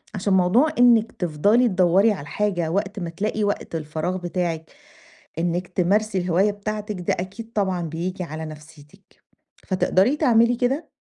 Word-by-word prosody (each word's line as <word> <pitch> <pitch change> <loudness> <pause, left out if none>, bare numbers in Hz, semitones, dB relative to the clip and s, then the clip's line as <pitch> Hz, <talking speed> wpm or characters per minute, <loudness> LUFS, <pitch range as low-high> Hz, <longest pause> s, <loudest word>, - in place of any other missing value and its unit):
عشان 195 0 0
موضوع 190 - +4
إنِّك 235 -2 +5
تِفضلي 200 +9 +2
تدوّري 190 +2 +3
على 195 - -4
الحاجة 175 +1 -2
وقت 200 +2 -2
ما 170 - -4
تلاقي 210 +5 -2
وقت 205 -4 -2
الفراغ 160 +3 -3
بتاعِك 175 -2 -3 0.7
إنِّك 175 +1 -1
تمارسي 195 +3 +1
الهواية 180 +3 +2
بتاعتِك، 210 -1 -5
ده 175 - 0
أكيد 220 +5 -8
طبعًا 190 -4 0
بييجي 170 +3 -4
على 160 0 -6
نَفْسيتِك. 150 -1 -14 0.4
فتقدري 190 +7 +2
تعملي 240 -5 +3
كده؟ 265 +6 -1
185 Hz, 140 wpm, -23 LUFS, 170-215 Hz, 0.7 s, إنِّك